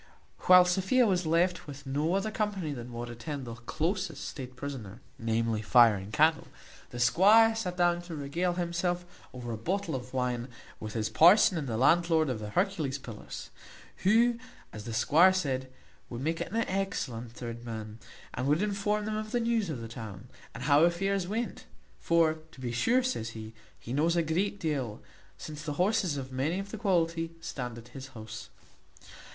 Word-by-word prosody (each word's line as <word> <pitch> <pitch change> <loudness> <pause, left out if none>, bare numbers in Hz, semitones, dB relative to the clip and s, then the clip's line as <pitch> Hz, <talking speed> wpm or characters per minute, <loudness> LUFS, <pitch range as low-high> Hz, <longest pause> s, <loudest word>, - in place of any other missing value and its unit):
While 180 -1 +9
Sophia 190 +8 +3
was 180 -5 +1
left 175 +2 +1
with 140 0 -9
no 150 +6 0
other 205 +2 -1
company 200 -8 -2
than 120 -2 -7
what 120 0 -5
attend 130 +4 -6
the 115 - -6
closest 165 - -3
state 130 -2 -7
prisoner, 120 -6 -7 0.2
namely, 115 -1 0
fire 115 0 +6
and 100 0 -6
candle, 155 +5 +3 0.4
the 120 - -7
squire 210 - +6
sat 180 -5 -3
down 175 -1 +2
to 175 -2 -8
regale 155 +5 -1
himself 175 0 -1 0.3
over 120 -2 -6
a 115 - -3
bottle 180 - -2
of 125 -1 -5
wine, 125 -2 -1 0.3
with 110 -1 -6
his 110 -2 -1
parson 185 +3 +6
and 155 -4 -3
the 115 -2 -2
landlord 160 +2 +3
of 115 - -3
the 105 -1 -6
Hercules 160 - 0
Pillars, 115 -6 -9 0.5
who, 230 +4 +3 0.3
as 105 -1 -8
the 115 - -5
squire 170 +10 +5
said, 130 -7 -2 0.4
would 120 0 -6
make 160 +4 -1
an 215 - -4
excellent 185 - -2
third 120 -1 -7
man, 110 -2 -7 0.3
and 130 +2 -2
could 150 +7 +2
inform 210 +1 0
them 215 0 -2
of 215 0 -4
the 245 - +1
news 230 -4 0
of 135 -7 -4
the 115 - -6
town, 110 -3 -9 0.3
and - - -6
how 145 +1 +5
affairs 185 +2 +1
went; 225 +5 -3 0.3
for 165 -1 +2
to - - -16
be 125 -2 -3
sure, 235 - +2
says 245 - -2
he, 110 0 -8 0.2
he 120 - -7
knows 160 +5 +2
a 170 - +2
great 185 +6 -1
deal, 135 - -2 0.4
since 155 -1 -8
the 150 -2 -4
horses 180 -1 +1
of 130 -1 -6
many 140 +7 -1
of 195 +1 -5
the 220 - -6
quality 165 -5 0
stand 125 -7 -5
at 115 +1 -12
his 135 -1 -9
house. 110 0 -8
155 Hz, 180 wpm, -30 LUFS, 120-185 Hz, 0.5 s, While